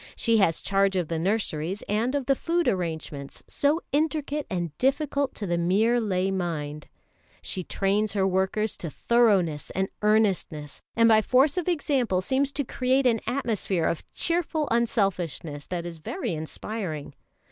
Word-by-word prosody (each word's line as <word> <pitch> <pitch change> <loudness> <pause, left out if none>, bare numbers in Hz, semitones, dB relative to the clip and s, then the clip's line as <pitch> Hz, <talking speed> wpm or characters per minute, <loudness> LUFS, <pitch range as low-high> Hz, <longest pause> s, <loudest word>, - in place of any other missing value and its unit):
She 230 -2 +3
has 180 -6 +2
charge 195 0 +2
of 180 -4 -1
the 165 -1 -1
nurseries 190 -1 -1
and 225 +6 0
of 280 -2 -1
the 275 - +4
food 340 +4 0
arrangements, 160 -6 -3
so 295 +4 +1
intricate 300 -1 0
and 175 -5 -3
difficult 280 +1 +1
to 210 - -4
the 175 -2 0
mere 215 +8 +3
lay 190 -3 0
mind; 155 -5 -3 0.6
she 185 - -3
trains 200 +3 0
her 195 -2 +2
workers 190 +3 0
to 170 - -5
thoroughness 195 -7 +2
and 190 0 -1
earnestness, 195 -9 +1
and 230 0 +5
by 220 -1 +6
force 265 +6 +3
of 360 -2 -2
example 275 - +1
seems 265 +8 +1
to 285 - 0
create 260 +1 +1
an 230 -3 +3
atmosphere 215 -9 0
of 165 - -1
cheerful 335 -3 0
unselfishness 185 - -1
that 175 -2 -3
is 170 -2 -7
very 330 - -3
inspiring. 160 -1 -5
205 Hz, 155 wpm, -26 LUFS, 175-255 Hz, 0.6 s, by